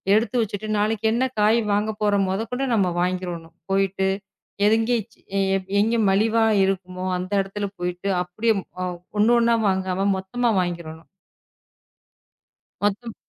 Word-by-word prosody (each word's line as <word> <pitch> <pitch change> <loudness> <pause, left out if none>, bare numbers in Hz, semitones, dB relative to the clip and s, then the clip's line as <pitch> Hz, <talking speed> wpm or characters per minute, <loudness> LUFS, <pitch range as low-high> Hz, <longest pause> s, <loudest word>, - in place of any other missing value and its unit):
எடுத்து 235 +3 +1
வச்சிட்டு 215 0 -4
நாளைக்கு 220 +1 0
என்ன 245 +3 +2 0.2
காய் 220 +3 +4
வாங்க 210 +1 +1
போறோம். 200 -2 +2
முதற்கொண்டு 250 +7 -2
நாம 190 -4 +2
வாங்கிடனும். 175 -2 -3 0.2
போயிட்டு 195 0 +1 0.6
எங்க, 225 +2 +2 0.9
எங்க 225 +3 +2
மலிவா 225 +3 +3 0.2
இருக்குமோ 185 -1 -3
அந்த 185 +2 -5
இடத்துல 200 +1 -4
போயிட்டு 180 +2 -3
அப்படியே 220 +6 0 0.7
ஒண்ணு 220 +3 +5
ஒண்ணா 235 0 +3
வாங்காம 190 0 0
மொத்தமா 235 +6 -1
வாங்கிரணும். 170 -2 -6 1.8
மொத்தம் 215 +3 -1
200 Hz, 115 wpm, -23 LUFS, 185-225 Hz, 1.8 s, ஒண்ணு